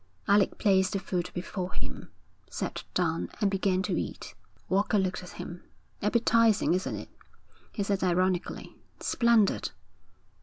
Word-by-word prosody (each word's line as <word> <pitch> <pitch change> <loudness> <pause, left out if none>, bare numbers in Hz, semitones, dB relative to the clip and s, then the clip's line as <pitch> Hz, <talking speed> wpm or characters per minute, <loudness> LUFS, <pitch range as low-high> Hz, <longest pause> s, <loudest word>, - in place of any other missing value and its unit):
Alec 200 -1 +4
placed 190 -2 +3
the 195 - 0
food 180 -2 -2
before 180 +1 -4
him, - - -6 0.4
sat - - -4
down, 165 -2 0
and 205 -3 +2
began 190 -1 +1
to - - -1
eat. - - -6 0.3
Walker 200 +3 +2
looked 185 -2 0
at 180 - -10
him. 175 0 -7 0.4
'Appetising, 230 -2 +3
isn't 185 +1 -1
it?' - - -7 0.6
he 205 - -2
said 195 -1 0
ironically. 185 0 0 0.2
'Splendid!' 235 -4 +3
190 Hz, 130 wpm, -29 LUFS, 185-205 Hz, 0.6 s, Alec